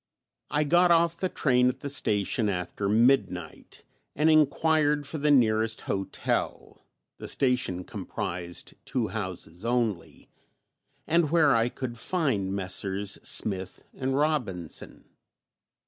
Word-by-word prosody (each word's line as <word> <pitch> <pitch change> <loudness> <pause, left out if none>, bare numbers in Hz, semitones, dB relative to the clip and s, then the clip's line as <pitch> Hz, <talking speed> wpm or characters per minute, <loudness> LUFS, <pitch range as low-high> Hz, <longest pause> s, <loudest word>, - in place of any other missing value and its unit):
I 150 - +1
got 175 +4 +4
off 170 0 +3
the 185 - -1
train 125 -6 +3
at 125 - -5
the 145 - -4
station 110 -5 0
after 95 +1 -3
midnight, 105 -6 0 0.3
and 155 +2 +3
enquired 150 -1 +3
for 150 +3 -4
the 150 +1 +1
nearest 110 -4 +3
hotel 95 -1 -3 0.3
(the - - -7
station 125 -9 0
comprised 90 -4 -6
two 120 -5 -2
houses 95 -3 -6
only), 115 -7 -2 0.8
and 165 -1 +2
where 155 -5 +4
I 115 +1 +2
could 120 -2 -6
find 125 - -1
Messrs. 95 +1 -1
Smith 95 -3 0
and 130 0 -2
Robinson. 125 - -2
120 Hz, 115 wpm, -27 LUFS, 100-145 Hz, 0.8 s, got